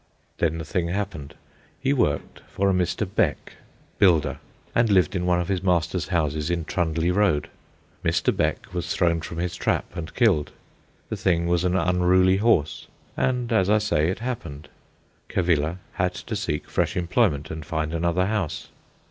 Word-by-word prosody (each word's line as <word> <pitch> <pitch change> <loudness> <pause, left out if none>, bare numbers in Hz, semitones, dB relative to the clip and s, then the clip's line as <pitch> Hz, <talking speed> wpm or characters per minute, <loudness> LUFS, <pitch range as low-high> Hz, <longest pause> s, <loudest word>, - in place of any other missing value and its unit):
Then 80 -1 +1
the 80 - -5
thing 85 +2 -1
happened. 85 -6 -4 0.4
He 135 +1 +1
worked 75 - 0
for 100 0 +1
a - - +2
Mr. 90 -2 0
Beck, - - -1 0.5
builder, 85 -6 +3 0.3
and 115 -1 +3
lived 95 -3 +3
in 90 -1 -1
one 90 -1 +3
of 85 - -2
his 95 -3 -1
master's 90 -3 0
houses 75 -1 0
in 85 -2 -1
Trundley 85 0 0
Road. 95 -6 +2 0.5
Mr. - - +1
Beck - - -1
was 85 -1 -3
thrown 85 -2 +2
from 80 +1 -7
his 90 +1 -2
trap - - 0
and 85 -1 -6
killed. 100 - +2 0.6
The - - -3
thing 85 -3 +1
was 85 0 +1
an 90 0 +1
unruly 90 +1 +3
horse, 100 -8 +1 0.3
and, 125 -2 0
as 95 -3 +3
I 105 - +5
say, 90 -7 +1
it 95 - -2
happened. 85 - -6 0.6
Cavilla 85 -2 +1 0.2
had 90 0 -1
to - - -5
seek 75 - -3
fresh - - -1
employment 90 - +1
and 80 -1 -5
find 80 0 -3
another 85 +2 +1
house. 100 -6 -2
90 Hz, 165 wpm, -24 LUFS, 80-95 Hz, 0.6 s, I